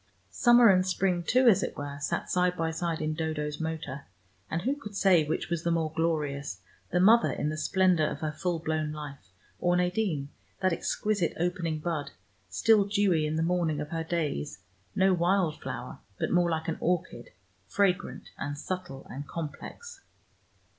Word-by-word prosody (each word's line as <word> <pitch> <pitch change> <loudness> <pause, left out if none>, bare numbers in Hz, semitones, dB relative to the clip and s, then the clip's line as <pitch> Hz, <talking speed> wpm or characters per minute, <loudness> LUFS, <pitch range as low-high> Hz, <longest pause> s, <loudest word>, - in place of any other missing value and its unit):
Summer 240 -1 +6
and 185 -1 +5
spring 185 -1 0
too, 250 +9 +3
as 210 -6 +6
it - - -4
were, 145 0 -5
sat 145 - -2
side 180 0 +1
by 165 0 0
side 165 -1 -2
in 155 0 -1
Dodo's 155 -2 -3
motor, 160 -4 -5 0.4
and 165 +1 -2
who 270 +4 +1
could 210 -8 -9
say 190 -5 +5
which 155 +2 -3
was 170 -2 0
the 170 - -1
more 165 -2 0
glorious, 145 - -1 0.3
the 180 - +1
mother 225 +6 +6
in 150 - -2
the 155 - -3
splendor 180 -2 +3
of - - -5
her 155 -1 -1
full 175 +2 -2
blown 155 -1 -2
life, 145 -9 -8 0.3
or 175 0 +2
Nadine, 180 -5 0 0.3
that 185 -2 +2
exquisite 200 0 -1
opening 175 -2 -1
bud, 155 -2 -3 0.4
still 205 - +4
dewy 195 -6 +2
in 155 - -2
the 160 - +1
morning 165 -3 0
of 150 0 -4
her 165 0 -2
days, 160 - -2 0.4
no 190 0 +4
wild 175 -2 +1
flower, - - -6 0.2
but - - -1
more 175 -1 +3
like 160 -1 -2
an 165 - -2
orchid, 165 -9 -2 0.4
fragrant 200 -1 0
and 145 0 -3
subtle 180 -5 -5
and 140 +2 -7
complex. 170 - -7
165 Hz, 175 wpm, -29 LUFS, 155-185 Hz, 0.4 s, Summer